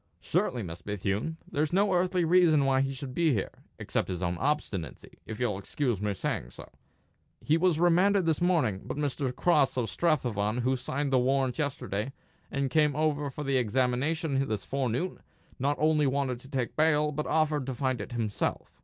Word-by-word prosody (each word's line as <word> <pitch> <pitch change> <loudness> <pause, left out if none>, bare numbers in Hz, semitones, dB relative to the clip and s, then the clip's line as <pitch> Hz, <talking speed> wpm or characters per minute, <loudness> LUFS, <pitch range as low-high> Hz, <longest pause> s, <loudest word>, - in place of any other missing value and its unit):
"Surely, 120 -3 -1
Miss 85 -2 -7
Bethune. 105 - -2
There's 150 +1 -1
no 195 +2 +3
earthly 180 -1 +2
reason 165 -4 +5
why 135 -1 +3
he 135 0 0
should 130 -1 -6
be 165 0 +2
here, 100 - -2 0.3
except - - -2
his 90 -1 -4
own 85 0 0
obstinacy, 95 - -3
if 110 - -6
you'll 110 -6 0
excuse 120 0 -2
my 105 -1 0
saying - - -3
so. - - -12 0.7
He 150 - +2
was 165 -1 +2
remanded 180 +3 +4
this 160 -1 +1
morning; 150 - +2
but - - -5
Mr. 140 -2 -1
Cross 150 -7 +2
of 115 -4 -1
Strathavon, 120 - 0
who 130 +2 +1
signed 135 +2 -2
the 130 - +5
warrant 130 +1 +1
yesterday, 130 -5 -2 0.4
and 140 -1 -1
came 150 -2 +3
over 150 -2 0
for 150 +2 -6
the 135 -2 +1
examination 135 - 0
this 110 -4 -3
forenoon, 135 +6 -2 0.4
not 145 +3 +1
only 155 -1 +3
wanted 135 -2 -1
to 135 - -14
take 130 -4 -2
bail, 150 -1 +3
but 150 +1 -3
offered 150 -4 +1
to 130 - -3
find 130 -3 -1
it 105 - -7
himself. 110 -4 -2
135 Hz, 180 wpm, -29 LUFS, 120-155 Hz, 0.7 s, reason